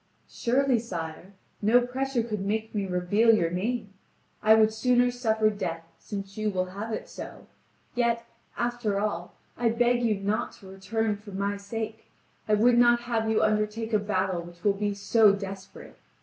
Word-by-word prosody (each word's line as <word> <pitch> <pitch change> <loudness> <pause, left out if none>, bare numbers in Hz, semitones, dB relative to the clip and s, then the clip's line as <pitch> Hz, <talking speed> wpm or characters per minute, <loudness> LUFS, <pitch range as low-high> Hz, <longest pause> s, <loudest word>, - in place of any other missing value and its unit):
"Surely, 255 0 +1
sire, 175 -3 -6 0.3
no 220 +4 +5
pressure 260 -1 -1
could 215 -3 -3
make 220 +2 -2
me 200 -2 -1
reveal 200 +6 +3
your 170 -5 +1
name. 205 +3 -2 0.5
I 220 +1 +6
would 220 0 +4
sooner 245 +2 +3
suffer 220 -3 +1
death, 165 -5 -4 0.2
since 195 0 -7
you 215 0 +1
will 185 -2 -1
have 210 +3 -5
it 220 - -4
so. - - -9 0.5
Yet, 235 -1 0 0.3
after 240 -4 -1
all, 180 -4 -3 0.2
I 235 -1 +1
beg 240 +1 +2
you 225 -3 +2
not 205 +2 -1
to 195 - -15
return 205 +3 -2
for 205 -1 -12
my 200 +1 -1
sake. 220 +2 -5 0.4
I 210 - +5
would 240 +3 +4
not 240 0 +5
have 230 -2 -1
you 220 - +2
undertake 215 +1 0
a 215 - +4
battle 190 -3 -1
which 175 0 -13
will 205 - +4
be 205 0 -2
so 210 +1 +4
desperate. 195 -1 -8
215 Hz, 170 wpm, -27 LUFS, 200-230 Hz, 0.5 s, I